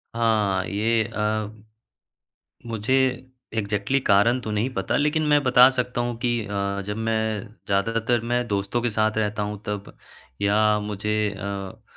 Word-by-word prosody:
हाँ। 105 -5 +1
ये 110 +3 +1
अ, 105 0 -1 1.2
मुझे 115 +2 -1 0.6
एक्ज़ेक्टली 105 +5 0
कारण 110 +5 +4
तो 110 - -5
नहीं 105 +5 0
पता। 95 -4 -1
लेकिन 150 +2 +1
मैं 145 -1 +4
बता 125 -1 +7
सकता 125 -1 -2
हूँ 120 -1 -2
कि 120 -1 +2
अ, 100 0 -2
जब 105 0 -3
मैं 110 -1 -1 0.2
ज़्यादातर 115 +4 +1
मैं 120 0 +1
दोस्तों 100 +4 -1
के 120 - 0
साथ 110 0 0
रहता 105 -1 -1
हूँ 105 0 -4
तब 105 -1 -5 0.5
या 105 +1 +3
मुझे 105 0 -3 0.3
अ, 100 -1 -6
110 Hz, 145 wpm, -24 LUFS, 100-120 Hz, 1.2 s, बता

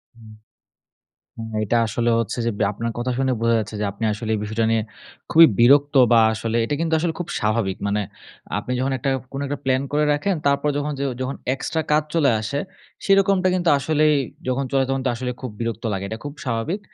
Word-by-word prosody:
হুম। 110 -2 -15 1.2
হ্যাঁ, 110 - -1
এটা 115 +3 +1
আসলে 120 +2 0
হচ্ছে 115 - -4
যে, - - +2
ব্যা 105 - +2
আপনার 115 +3 -4
কথা 120 +1 -2
শুনে 130 -1 +1
বোঝা 115 0 +2
যাচ্ছে, 110 0 -4
যে - - 0
আপনি 100 +3 -5
আসলে 110 +1 -5
এই - - -1
বিষয়টা 110 +2 -1
নিয়ে 115 -1 +2 0.5
খুবই 165 +1 +8
বিরক্ত 140 +5 +5 0.2
বা 115 - +7
আসলে 110 +1 -2
এটা 130 - -1
কিন্তু 165 -1 +1
আসলে 165 0 -1
খুব 175 - -4
স্বাভাবিক। 105 -3 0
মানে 100 +1 0 0.6
আপনি 125 - -4
যখন 135 +2 0
একটা 135 +3 -1 0.2
কোন 135 - -4
একটা 145 0 -3
প্লান 130 0 +1
করে 150 +1 +2
রাখেন, 185 +7 0
তারপর 140 +1 +2
যখন 145 +1 -2
যে - - -3 0.2
যখন 130 +1 -3 0.2
এক্সট্রা 160 +4 -2
কাজ 150 +1 +4
চলে 155 -5 +4
আসে, 110 +6 -3 0.5
সেরকমটা 195 -1 +3
কিন্তু 180 -2 0
আসলেই 155 +1 +2 0.3
যখন 130 +2 0
চলে 135 -1 +3
তখন 135 0 -1
তো - - +3
আসলে 125 +1 -3
খুব 130 - -5
বিরক্ত 115 -1 -3
লাগে। 95 0 -3
এটা 110 +2 -5
খুব 145 - -5
স্বাভাবিক। 125 - -2
130 Hz, 205 wpm, -22 LUFS, 115-145 Hz, 1.2 s, খুবই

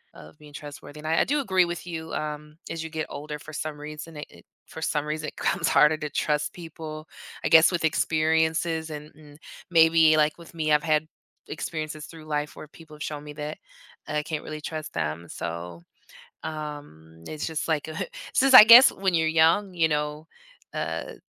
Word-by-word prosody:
of 75 +1 -14
being 150 -1 -15
trustworthy, 145 0 -10
and 155 - -7
I 160 - +2
I - - +5
do 295 +2 0
agree 190 -9 +2
with 175 0 -6
you, 165 -2 -6
um, 150 0 -5
as 165 -1 -4
you 160 - -6
get 155 -1 -3
older, 150 +1 -6
for 155 +1 -12
some 150 -1 -5
reason 150 +1 -8
it 150 - -6
it - - -18 0.2
for 160 - -9
some 150 -1 0
reason 155 0 -3
it - - -19
becomes - - 0
harder 155 +1 +5
to 150 -1 -5
trust 150 0 -1
people, 160 -2 -9 0.4
I - - +1
guess, 160 +2 +7
with 170 -2 0
experiences 160 +1 +1
and 150 0 -8
and 150 -1 -16 0.3
maybe 160 -2 +5
like 150 0 +2
with 170 - -14
me, 155 -2 -1
I've 150 - +4
had 155 -1 +1 0.4
experiences 155 -1 -5
through 160 -2 -12
life 150 -1 -3
where - - -10
people 155 0 -15
have 150 - -7
shown 150 -1 -5
me 150 0 -9
that 150 +1 -6 0.5
that 150 - -4
I 150 - 0
can't 155 0 -4
really 155 0 -7
trust 155 0 -6
them 80 +1 -3
so, 85 0 -6 0.6
um, 145 - -8
it's 155 -1 -5
just 160 -1 -3
like 160 -1 -1
a 155 - -7
hu - - -2 0.3
since 270 0 +4
I 255 - +14
guess 235 +4 +10
when 190 -2 -1
you're 160 -1 +2
young, 165 +5 +3
you 165 -2 +2
know, 150 0 -2 0.5
uh, - - -4
155 Hz, 205 wpm, -26 LUFS, 150-160 Hz, 0.6 s, I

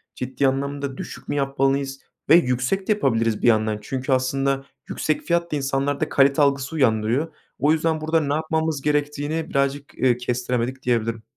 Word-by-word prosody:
ciddi 130 +2 -1
anlamda 140 0 -2
düşük - - -8
mü - - -2
yapmalıyız 135 0 0 0.3
ve 160 - +9
yüksek 150 +5 +1
de - - +2
yapabiliriz 115 - +1
bir - - +2
yandan. 110 -2 +2
Çünkü 130 +5 -4
aslında 135 +1 +1 0.2
yüksek 155 - -1
fiyat 170 0 0
da - - 0
insanlarda 140 0 -1
kalite 140 +1 +4
algısı 140 +1 +1
uyandırıyor. 125 +3 +1 0.3
O 145 - +3
yüzden 160 0 +1
burada 160 +1 +2
ne 145 -1 -1
yapmamız 160 -1 -1
gerektiğini 150 +2 -1
birazcık, 140 +1 -1
ııı, 125 -2 +4
kestiremedik 125 +1 -2
diyebilirim. 115 -2 0
140 Hz, 160 wpm, -23 LUFS, 125-150 Hz, 0.3 s, ve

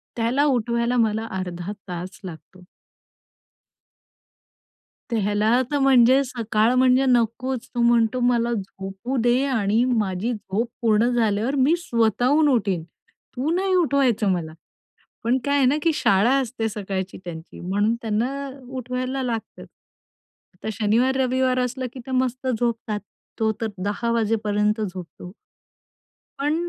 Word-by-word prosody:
त्याला 240 +5 +1
उठवायला 235 -2 +1
मला 220 -1 +1
अर्धा 180 0 -5 0.2
तास 180 +1 -6
लागतो. 180 +1 -11 2.5
त्याला 215 +2 +2
तर 290 - +1
म्हणजे 265 0 +5
सकाळ 230 -2 +1
म्हणजे 255 +1 +4
नकोच, 250 +1 0
तो 240 - +1
म्हणतो, 235 0 +3
"मला 240 -1 +2
झोपू 195 +4 -5
दे 245 +3 +3
आणि 225 -4 +1
माझी 220 -2 0
झोप 210 +1 -3
पूर्ण 225 0 +3
झाल्यावर 225 +3 +1
मी 280 +4 +3
स्वतःहून 250 - +2
उठीन, 195 - +1
तू 250 - -8
नाही 380 +1 0
उठवायचं 275 - +2
मला." 165 -3 -2 0.7
पण 240 +3 +2
काय 285 0 +2
आहे 275 - +4
ना 260 +3 +3
की 330 - +3
शाळा 205 -2 +3
असते 230 -3 -2
सकाळची 195 -3 -4
त्यांची, 165 -1 -9
म्हणून 205 +5 0
त्यांना 250 +6 -2 0.2
उठवायला 255 +1 -3
लागत. 230 -3 -4
आता 180 +3 -14
शनिवार, 225 +5 +1
रविवार 255 0 +1
असलं 255 +1 -2
की 265 - -9
त्या 265 - -5
मस्त 255 0 -1
झोपतात. 225 -3 -1 0.4
तो 220 -1 +2
तर 225 - 0 0.2
10:00 210 +4 -1
वाजेपर्यंत 215 -1 +1
झोपतो. 180 -2 -7 1.1
पण 295 +2 +1
235 Hz, 125 wpm, -23 LUFS, 210-255 Hz, 2.5 s, म्हणजे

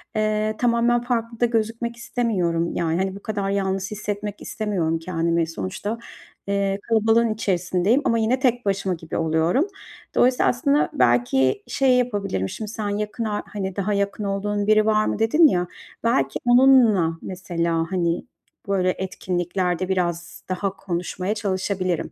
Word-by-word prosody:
eee, 215 0 0
tamamen 240 0 +2
farklı 230 -2 -2
da 240 - +4
gözükmek 230 0 -1
istemiyorum. 185 -9 -1
Yani, 165 -1 0
hani, 190 +1 -1
bu 200 - -10
kadar 205 -3 -2
yalnız 195 -1 -1
hissetmek 210 0 -4
istemiyorum 180 -7 -1
kendimi. 165 -1 0
Sonuçta, 165 - -4 0.5
eee, 200 0 0
kalabalığın 225 0 +3
içerisindeyim 190 +3 +1
ama 230 - +2
yine 230 +4 +1
tek 245 -2 +1
başıma 195 -2 0
gibi 165 -1 -6
oluyorum. 165 - +1 0.5
Dolayısıyla 250 0 +4
aslında 280 +4 +2
belki 125 +2 +2
şey 260 -2 +3
yapabilirim, 200 - -1
şimdi 215 -2 -6
sen 215 -2 -3
yakın 210 +3 -3
ar 210 -1 -2
hani, 195 -2 -5
daha 200 +1 -1
yakın 200 +1 -1
olduğun 205 +1 -1
biri 215 0 +5
var 215 0 +3
mı - - -2
dedin 305 +9 +5
ya, 180 -8 0 0.4
belki 135 -13 +1
onunla 240 -9 +5
mesela, 170 -3 -2
hani, 170 -2 0 0.4
böyle 190 -2 +1
etkinliklerde 180 0 -2
biraz 175 -2 -2
daha 190 +1 -2
konuşmaya 180 +2 -3
çalışabilirim. 190 -4 -2
200 Hz, 140 wpm, -23 LUFS, 175-225 Hz, 0.5 s, biri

